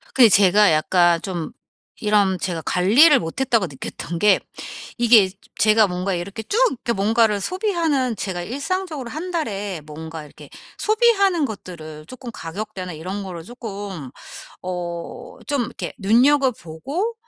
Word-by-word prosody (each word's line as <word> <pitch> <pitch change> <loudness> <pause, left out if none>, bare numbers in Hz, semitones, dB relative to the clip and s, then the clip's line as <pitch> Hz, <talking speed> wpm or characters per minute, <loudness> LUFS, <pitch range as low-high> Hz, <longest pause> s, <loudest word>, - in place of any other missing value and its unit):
근데 245 -4 +7
제가 200 0 +5
약간 170 +2 +3
좀 175 -5 -4 0.5
이런 205 -3 +2
제가 170 -2 -3
관리를 250 - +5
못했다고 230 +4 0
느꼈던 165 +4 -6
게 210 +1 +5 0.6
이게 230 -5 +6
저 185 - -15 0.2
제가 215 0 +5
뭔가 185 +1 -2
이렇게 195 +5 -5
쭉 410 - -2
이렇게 245 -1 -3
뭔가를 215 0 +2
소비하는 325 - 0
제가 185 -4 -4
일상적으로 285 - -4
1 335 +5 -5
달에 205 - -3
뭔가 160 +1 -8
이렇게 145 - -14 0.3
소비하는 420 -6 +3
것들을 160 - -8
쪼끔 255 +1 -9
가격대나 185 0 -6
이런 185 +6 -5
거를 180 -4 -7
쪼끔 200 - -7 0.5
어 175 -2 -6
좀 285 -4 0
이렇게 - - -6
눈여겨보고 260 - +1
205 Hz, 300 characters per minute, -21 LUFS, 180-260 Hz, 0.6 s, 근데